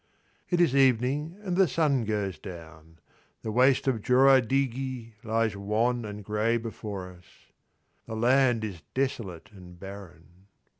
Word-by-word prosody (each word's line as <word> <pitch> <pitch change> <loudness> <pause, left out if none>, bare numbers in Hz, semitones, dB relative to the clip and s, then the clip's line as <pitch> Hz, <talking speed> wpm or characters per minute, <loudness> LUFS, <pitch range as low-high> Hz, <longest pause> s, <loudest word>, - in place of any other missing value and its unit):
It 175 - +1
is 165 -6 +3
evening 135 - +2
and 185 -3 -2
the 190 0 +4
sun 140 -4 +1
goes 100 -6 -2
down. 80 -3 -11 0.5
The 110 - -3
waste 130 +4 +3
of 120 -5 +1
Joradighi 130 -1 +2
lies 115 -1 0
wan 110 +4 0
and 105 0 -7
grey 105 +3 0
before 105 -5 -6
us. 90 -1 -18 0.8
The 110 - -5
land 120 0 +3
is 95 -6 -5
desolate 115 -10 -3
and 90 -3 -14
barren. 95 -1 -12
115 Hz, 135 wpm, -27 LUFS, 100-130 Hz, 0.8 s, the